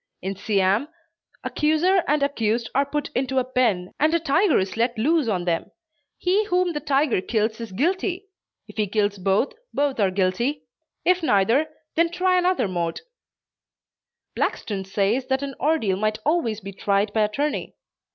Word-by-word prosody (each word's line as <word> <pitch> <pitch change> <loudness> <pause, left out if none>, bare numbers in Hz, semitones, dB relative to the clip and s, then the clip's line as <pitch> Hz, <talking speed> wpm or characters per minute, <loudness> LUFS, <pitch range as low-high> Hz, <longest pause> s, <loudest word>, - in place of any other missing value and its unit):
In 195 +1 -3
Siam, 200 +5 +1 0.6
accuser 330 +5 +2
and 295 0 +2
accused 230 -4 0
are 275 +1 +2
put 295 0 -2
into 265 +1 -1
a 260 - +4
pen 235 -8 0
and 310 +2 +3
a - - +3
tiger 330 +3 +3
is 190 0 -1
let 235 +1 0
loose 300 +4 +2
on 185 -5 -1
them. 170 -2 -1 0.5
He 380 +4 +2
whom 360 -3 +1
the 295 - -2
tiger 275 -6 +1
kills 220 +2 -1
is 230 -3 -6
guilty. 365 - -1 0.4
If - - -14
he 210 -1 +1
kills 205 0 0
both, 195 - +1 0.2
both 280 -3 0
are 200 -2 +3
guilty; 195 +10 0 0.4
if 365 0 +3
neither, 235 +2 +3 0.3
they 335 +1 +3
try 365 +2 +2
another 360 - +1
mode. 170 -3 -2 1.3
Blackstone 195 -3 -2
says 205 +6 0
that 265 +1 0
an 275 -1 -4
ordeal 265 -10 +1
might 215 +1 0
always 260 -9 0
be 195 0 -8
tried 200 +2 0
by 220 - +2
attorney. 280 +8 -1
250 Hz, 160 wpm, -23 LUFS, 200-305 Hz, 1.3 s, a